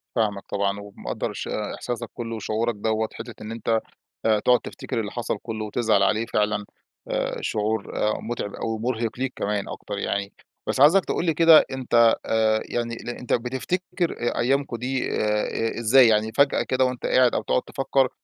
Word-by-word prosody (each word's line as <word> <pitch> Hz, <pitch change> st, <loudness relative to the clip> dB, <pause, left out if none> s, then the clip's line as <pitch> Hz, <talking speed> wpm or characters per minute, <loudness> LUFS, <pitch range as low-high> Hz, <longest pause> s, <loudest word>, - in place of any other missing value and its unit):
فاهمك 105 Hz, -4 st, 0 dB
طبعًا، 100 Hz, 0 st, -1 dB
ومقدّر 100 Hz, -12 st, -5 dB
الش -, -, -6 dB
إحساسك 115 Hz, +2 st, -4 dB
كلّه 115 Hz, -1 st, -5 dB
وشعورك 110 Hz, +2 st, -1 dB
دوَّة، 110 Hz, +1 st, 0 dB
حتِّة 120 Hz, -, -8 dB
إن 110 Hz, +1 st, -6 dB
أنت 115 Hz, 0 st, 0 dB, 0.4 s
آآ، 110 Hz, -1 st, +4 dB
تقعد 125 Hz, +3 st, +4 dB
تفتكر -, -, -5 dB
اللي 105 Hz, -2 st, -3 dB
حصل 115 Hz, -3 st, -2 dB
كلّه 110 Hz, -2 st, -4 dB
وتزعل 110 Hz, -2 st, +2 dB
عليه، 110 Hz, +3 st, +2 dB
فعلًا 105 Hz, -2 st, 0 dB, 0.4 s
آآ، -, -, -1 dB
شعور 105 Hz, 0 st, -2 dB
آآ، 105 Hz, -, +2 dB
متعب 110 Hz, -3 st, -4 dB
أوي 115 Hz, 0 st, -2 dB
ومرهق 115 Hz, 0 st, -2 dB
ليك 130 Hz, 0 st, -2 dB
كمان 100 Hz, -1 st, -2 dB
أكتر 105 Hz, -, -6 dB
يعني. 100 Hz, 0 st, -2 dB, 0.3 s
بس -, -, -1 dB
عايزك 175 Hz, +6 st, +6 dB
تقول -, -, -1 dB
لي 165 Hz, -, +2 dB
كده 165 Hz, 0 st, +7 dB
أنت 120 Hz, -3 st, +4 dB
آآ، 110 Hz, -1 st, +2 dB
يعني 120 Hz, -1 st, -3 dB
ل 120 Hz, -, -8 dB
أنت 120 Hz, 0 st, -3 dB
بتفتكر 165 Hz, +9 st, -1 dB
آآ، 120 Hz, -, -1 dB
أيامكم 135 Hz, 0 st, +1 dB
دي 130 Hz, +2 st, -2 dB
آآ، 105 Hz, 0 st, +1 dB
آآ، 115 Hz, +1 st, -2 dB
إزاي، 120 Hz, +2 st, +6 dB
يعني 110 Hz, 0 st, +2 dB
فجأة 140 Hz, 0 st, +4 dB
كده 130 Hz, 0 st, +1 dB
وأنت 125 Hz, -1 st, -3 dB
قاعد 125 Hz, -1 st, +4 dB
أو -, -, +1 dB
تقعد 125 Hz, -, +1 dB
تفكَّر 135 Hz, -1 st, +1 dB
115 Hz, 180 wpm, -24 LUFS, 105-125 Hz, 0.4 s, كده